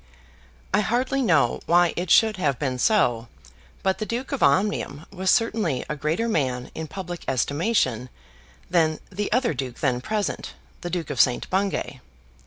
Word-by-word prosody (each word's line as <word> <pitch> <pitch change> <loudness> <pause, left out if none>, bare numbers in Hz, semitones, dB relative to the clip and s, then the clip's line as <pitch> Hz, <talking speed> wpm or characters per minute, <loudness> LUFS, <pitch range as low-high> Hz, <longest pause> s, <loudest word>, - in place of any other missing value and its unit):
I 205 - +4
hardly 250 +6 0
know 160 - +3
why 175 0 +4
it 175 0 -3
should 220 +1 +5
have 140 -8 0
been 130 -3 -2
so, 120 - +2 0.6
but 190 0 +1
the 215 - -2
Duke 245 +3 -4
of 280 - -2
Omnium 185 -6 +1
was 190 0 -1
certainly 215 - +1
a 150 - -2
greater 155 +10 -1
man 130 - -1
in 160 0 -5
public 175 0 -7
estimation 135 - 0 0.6
than 160 -3 +2
the 205 +2 -3
other 250 -2 +2
duke 125 -3 -5
then 125 -3 0
present, 210 +6 -3 0.3
the 175 - -4
Duke 175 -3 -3
of 130 - +3
St. 125 - +2
Bungay. 190 -8 -1
175 Hz, 160 wpm, -24 LUFS, 140-210 Hz, 0.6 s, should